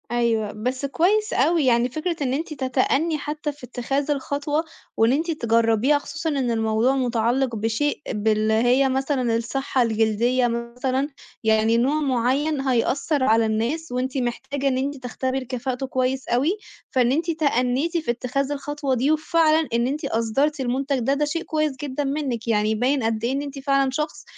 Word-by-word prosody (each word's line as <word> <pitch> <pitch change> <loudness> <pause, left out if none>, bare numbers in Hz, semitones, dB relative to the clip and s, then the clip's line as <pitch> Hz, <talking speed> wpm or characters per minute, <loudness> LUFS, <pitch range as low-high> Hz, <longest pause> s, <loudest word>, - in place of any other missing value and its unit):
أيوه، 230 -3 +1
بس 250 +6 -3
كويس 405 +9 +1
أوي، 310 +3 +2
يعني 240 0 +3
فكرة 315 +6 -2
إن 260 -2 0
أنتِ 310 +3 -3
تَتَأَنَّي 275 +4 +1
حتى 295 +1 -4
في 290 -2 -19
إتّخاذ 270 +4 -2
الخطوة 290 +2 -1 0.3
وإن 225 +2 +4
أنتِ 320 +5 0
تجّربيها، 230 0 +2
خصوصًا 320 +3 -4
إن 270 -5 0
الموضوع 225 +3 +1
مُتعّلق 245 0 0
بشيء 225 +8 -1
باللي 215 +1 +1
هي 245 +4 +3
مثلًا 260 -3 0
الصحة 260 +3 -1
الجلدية 230 +2 +2
مثلًا 250 +4 -2 0.3
يعني 220 +1 +3
نوع 275 +6 +2
معين 270 +3 +1
هيأثّر 270 +3 +1
على 225 -2 +4
الناس، 235 +9 -1
وأنتِ 255 +2 -2
محتاجة 265 +3 -2
إن 260 -1 +1
أنتِ 280 +2 -2
تختبري 260 +1 -2
كفاءته 255 +1 -3
كويس 260 0 -1
أوي، 285 - +1 0.3
فإن 250 -2 +3
أنتِ 330 +5 0
تأنِّيتِ 285 +1 +1
في 315 -7 0
إتخاذ 255 +3 -2
الخطوة 290 -1 -2
دي، 265 +5 +2
وفعلًا 315 0 +2
إن 235 +1 +2
أنتِ 290 +3 -3
أصدرتِ 270 +5 0
المنتج 265 +2 -1
ده، 255 +3 +1
ده 295 +1 +1
شيء 330 +3 -2
كويس 305 -3 -1
جدًا 290 0 -3
منِّك 270 -5 -2
يعني، - - +2
يعني 215 +1 +1
باين 255 +4 +1
قد 225 0 -1
إيه 240 - +1
إن 275 +1 -1
أنتِ 280 -1 -6
فعلًا 275 0 +2
شخص 300 +3 -3
265 Hz, 165 wpm, -23 LUFS, 235-290 Hz, 0.3 s, وإن